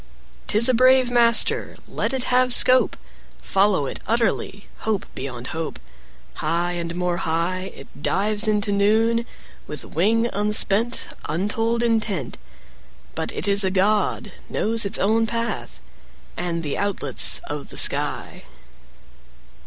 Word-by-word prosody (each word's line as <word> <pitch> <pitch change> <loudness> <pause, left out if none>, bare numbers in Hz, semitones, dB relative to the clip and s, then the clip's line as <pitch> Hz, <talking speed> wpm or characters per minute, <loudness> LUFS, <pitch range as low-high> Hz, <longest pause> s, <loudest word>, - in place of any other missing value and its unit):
'Tis 225 +3 +5
a 255 - +3
brave 255 +1 +4
master; 235 -1 +4
Let - - -2
it 265 -2 -2
have 250 0 +4
scope: 255 0 +4 0.4
Follow 195 -6 +1
it - - -5
utterly, 220 -3 -1
Hope 215 -3 -2
beyond 130 -2 -6
hope: 160 0 -4
10 - - -13 0.5
High 175 +1 -1
and 170 -1 -4
more 180 -1 -1
high 175 +4 -2
It - - -14
dives 210 +2 0
into 210 -1 +1
noon, 225 +4 +2 0.4
With 150 - -6
wing 225 +8 +1
unspent, 210 +2 +1 0.2
Untold 225 +8 0
intent; 215 - -1 0.7
But - - -4
it - - -2
is 200 0 +4
a 190 - +3
god, 200 +3 +1
15 - - -22
Knows 225 0 0
its 200 +2 0
own 225 +3 +1
path, 230 +1 -4 0.6
And 170 -1 -3
the 145 - -2
outlets 180 -10 0
of 145 -1 -6
the - - -8
sky. - - 0
205 Hz, 135 wpm, -22 LUFS, 175-230 Hz, 0.7 s, Tis